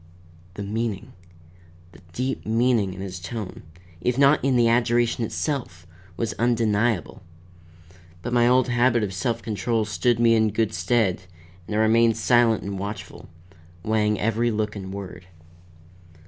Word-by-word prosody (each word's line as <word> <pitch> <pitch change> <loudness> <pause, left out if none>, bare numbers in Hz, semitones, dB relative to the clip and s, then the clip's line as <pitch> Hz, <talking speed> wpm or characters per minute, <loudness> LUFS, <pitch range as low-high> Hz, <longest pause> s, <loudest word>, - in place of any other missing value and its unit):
The 100 - -5
meaning, 110 0 -4 0.8
the - - -16
deep 130 +7 -3
meaning 115 -4 +1
in 95 - -8
his 95 -2 -6
tone, 100 +2 -6 0.4
if 125 0 0
not 140 +2 +4
in 135 -1 +2
the 120 -1 +4
adjuration 120 0 +2
itself, 110 - -3 0.3
was 115 0 -2
undeniable; 115 -4 0 1.0
but 120 - -4
my 120 -1 +4
old 125 +1 +4
habit 120 -1 +2
of 100 -2 -3
self 115 +4 -2
control 110 +1 -1
stood 120 +2 0
me 115 -1 +5
in 110 -1 +3
good 110 0 -1
stead 90 +2 +1 0.5
and 105 - -4
I - - +1
remained 115 0 +3
silent 115 -1 +3
and 100 -1 -5
watchful, 100 +2 -7 0.5
weighing 105 0 +1
every 115 +2 +1
look 105 -1 -2
and 95 -2 -7
word. 95 -3 -8
115 Hz, 145 wpm, -24 LUFS, 100-120 Hz, 1.0 s, me